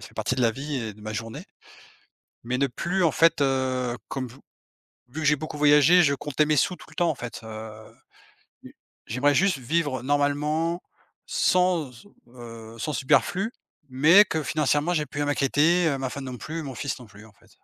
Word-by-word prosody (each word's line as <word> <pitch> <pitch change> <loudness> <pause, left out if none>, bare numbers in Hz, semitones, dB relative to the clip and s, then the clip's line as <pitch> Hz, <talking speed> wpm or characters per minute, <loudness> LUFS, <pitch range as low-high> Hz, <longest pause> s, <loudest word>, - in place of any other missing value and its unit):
fait - - -18
partie - - -1
de 125 - -1
la 115 - +4
vie 140 +4 -5
et 110 -4 -4
de 105 - -18
ma 110 0 -6
journée. 115 +1 -6 1.0
Mais 125 +2 -2
ne 140 - +2
plus 175 +8 -1
en 160 - +3
fait, 165 -2 +3
heu, 130 -2 0
comme 130 -2 -4
vu 125 - -15 0.7
vu 155 +6 -7
que - - -4
j'ai 150 +1 +4
beaucoup 155 +1 -7
voyagé 150 +4 +6
je 140 -3 +3
comptais 145 +2 0
mes 155 0 +2
sous 180 +6 +1
tout - - -15
le - - -16
temps 170 -2 +1
en - - -1
fait, 120 -3 -7
heu. 110 0 -10 0.7
J - - -13 0.3
j'aimerais 140 +5 +1
juste 185 -3 +3
vivre 135 -1 -1
normalement 150 +4 0 0.5
sans, 180 -7 +1
s 120 +10 -16 0.3
heu, 115 -2 -10
sans 150 - -3
superflu 190 - +1 0.4
mais 155 +11 +6
que 160 -5 -2
financièrement 150 +3 +1
j'ai 150 -3 0
plus 145 0 -5
à - - +1
m'inquiéter, 150 +4 +2
heu, 140 -3 0
ma 130 -1 -3
femme 140 +1 -7
non 125 -1 -6
plus, 160 +5 -6
mon 135 -2 -7
fils 140 0 -4
non 125 - -12
plus 105 +1 -15
en 110 - -17
fait. - - -26
145 Hz, 205 wpm, -25 LUFS, 125-155 Hz, 1.0 s, voyagé